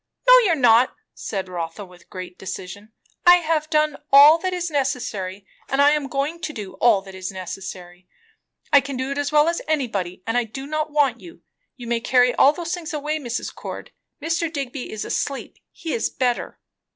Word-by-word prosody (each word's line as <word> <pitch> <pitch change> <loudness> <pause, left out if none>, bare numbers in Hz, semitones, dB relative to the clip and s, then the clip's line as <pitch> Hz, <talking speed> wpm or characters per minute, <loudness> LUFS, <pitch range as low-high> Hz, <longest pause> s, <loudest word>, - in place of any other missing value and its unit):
"No, - - +9
you - - +3
are - - +2
not," 245 -2 +4 0.2
said 195 -3 -5
Rotha 175 +2 -5
with 180 -1 -19
great 180 -1 -9
decision. 190 +3 -8 0.4
"I 355 - +10
have 315 -3 0
done 305 -2 +1
all 290 +4 +9
that 370 +2 -2
is 350 -2 -3
necessary, 235 -9 -2 0.2
and 270 - -1
I 285 +1 +6
am 300 -2 0
going 285 +5 -2
to 320 -2 -4
do 205 -8 -7
all 220 -5 +4
that 195 -1 -12
is 185 0 -6
necessary. 180 -1 -8 0.7
I 285 - +8
can 270 0 -6
do 260 +2 -3
it 280 - -2
as 290 0 -1
well 300 +1 +4
as 340 0 0
anybody; 205 - -2
and 225 +2 0
I - - 0
do 270 +5 -8
not 310 +1 -2
want 280 -5 +1
you. 340 -1 -14 0.3
You 245 - -10
may 235 0 0
carry 250 +1 +3
all 275 - +6
those 335 +2 -5
things 340 -2 -5
away, 300 +1 -2
Mrs. 240 -4 -4
Cord. - - -8 0.3
Mr. 330 +1 -1
Digby 275 -4 -5
is 215 - -5
asleep; 275 -1 -4
he 325 - -6
is 230 - 0
better." 245 -2 -2
270 Hz, 200 wpm, -22 LUFS, 205-305 Hz, 0.7 s, I